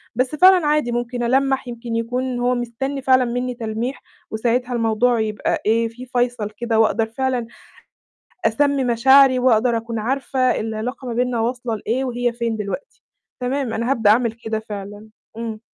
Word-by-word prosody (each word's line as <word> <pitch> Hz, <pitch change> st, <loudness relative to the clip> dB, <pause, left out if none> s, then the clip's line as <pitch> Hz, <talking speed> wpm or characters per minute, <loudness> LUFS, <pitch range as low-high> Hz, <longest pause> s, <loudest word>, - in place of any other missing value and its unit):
بس 255 Hz, +4 st, 0 dB
فعلًا 365 Hz, 0 st, +6 dB
عادي 295 Hz, -5 st, +1 dB
ممكن 240 Hz, 0 st, -2 dB
ألمَّح 270 Hz, +2 st, +1 dB
يمكن 235 Hz, -1 st, -5 dB
يكون 245 Hz, +2 st, -2 dB
هو 250 Hz, +1 st, +1 dB
مستنّي 245 Hz, +4 st, -3 dB
فعلًا 255 Hz, -1 st, +4 dB
منّي 245 Hz, +1 st, -2 dB
تلميح، 235 Hz, +2 st, -4 dB, 0.3 s
وساعتها 245 Hz, +3 st, 0 dB
الموضوع 230 Hz, +1 st, +2 dB
يبقى 215 Hz, -1 st, -1 dB
إيه، 230 Hz, +2 st, +2 dB
في 245 Hz, +3 st, -10 dB
فَيصَل 245 Hz, -4 st, -1 dB
كده 225 Hz, +1 st, -1 dB
وأقدر 225 Hz, 0 st, +3 dB
فعلًا 250 Hz, +1 st, -2 dB, 1.0 s
أسمّي 275 Hz, +4 st, +2 dB
مشاعري 260 Hz, +2 st, +5 dB
وأقدر 240 Hz, -1 st, +3 dB
أكون 230 Hz, 0 st, -4 dB
عارفة 255 Hz, +2 st, 0 dB
العلاقة 225 Hz, +4 st, -4 dB
ما -, -, -3 dB
بيننا 245 Hz, -1 st, 0 dB
واصلة 240 Hz, 0 st, -2 dB
لإيه، 240 Hz, +6 st, -2 dB
وهي 245 Hz, -1 st, -1 dB
فين 235 Hz, -1 st, -2 dB
دلوقتي. 210 Hz, -, -6 dB, 0.4 s
تمام، 255 Hz, -1 st, -2 dB
أنا 230 Hz, +3 st, -2 dB
هابدأ 225 Hz, -6 st, +3 dB
أعمل 230 Hz, 0 st, +3 dB
كده 225 Hz, -1 st, -4 dB
فعلًا، 205 Hz, +1 st, -7 dB, 0.3 s
إمم. 225 Hz, -2 st, -5 dB
240 Hz, 155 wpm, -21 LUFS, 225-255 Hz, 1.0 s, فعلًا